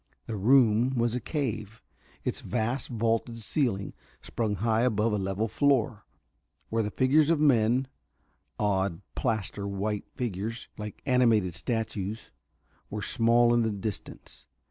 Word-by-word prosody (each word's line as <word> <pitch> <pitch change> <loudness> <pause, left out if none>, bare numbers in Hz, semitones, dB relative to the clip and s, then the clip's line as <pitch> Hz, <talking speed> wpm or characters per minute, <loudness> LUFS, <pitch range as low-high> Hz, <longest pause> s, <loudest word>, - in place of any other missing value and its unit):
The 115 - -4
room 120 +3 +4
was 120 -1 +1
a 125 - 0
cave, 115 - -4 0.4
its - - -2
vast 120 +2 -2
vaulted 115 0 -1
ceiling 105 -8 -1 0.3
sprung 110 -3 -2
high 110 +3 +1
above 110 -2 +2
a - - +1
level 95 +3 -1
floor, 120 -5 +1 0.6
where 115 0 +1
the 105 - -1
figures 140 +6 +3
of 165 -2 +3
men 130 -3 +3 0.7
odd, 100 -3 0
plaster 100 -2 -2
white 100 +1 -3
figures 115 0 -4
like 105 -1 -8
animated 115 -8 +3
statues 110 0 -3 0.6
were 105 0 -4
small 120 +1 +4
in 120 - +4
the 110 - +1
distance. 105 -1 -6
110 Hz, 130 wpm, -28 LUFS, 105-120 Hz, 0.7 s, room